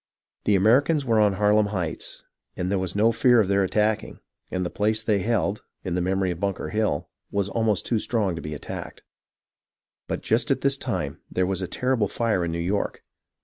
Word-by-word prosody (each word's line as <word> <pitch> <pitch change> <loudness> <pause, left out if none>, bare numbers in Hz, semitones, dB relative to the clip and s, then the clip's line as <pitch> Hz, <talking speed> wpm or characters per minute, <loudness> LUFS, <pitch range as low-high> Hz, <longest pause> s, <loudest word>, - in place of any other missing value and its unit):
The 105 - +4
Ameri 110 +8 +5
cans 155 -4 0
were 115 -3 +3
on 105 -2 +4
Harlem 105 +1 +3
Heights, 90 -6 -4 0.3
and 90 +1 -1
there 100 - +1
was 95 0 -3
no 110 +3 +4
fear 120 +1 +4
of 105 - +3
their 100 0 +3
attacking; 105 +3 0 0.3
and 90 -1 -2
the - - -3
place 110 +1 0
they 105 -2 +2
held, 105 0 0 0.2
in 90 - -3
the 90 - 0
memory 95 +1 +1
of 85 - -5
Bunker 100 0 -2
Hill, 105 -9 0 0.2
was 100 -1 -1
almost 110 -2 0
too 115 - +1
strong 105 -6 0
to 85 - -6
be 75 0 -5
attacked. - - -7 1.0
But - - -3
just - - +1
at - - +1
this - - +2
time - - -3
there 90 - +1
was 95 0 -1
a 95 - -2
terrible 125 +1 0
fire 110 -4 0
in 85 - -1
New 85 - -2
York. 95 +4 -2
100 Hz, 205 wpm, -25 LUFS, 95-110 Hz, 1.0 s, Ameri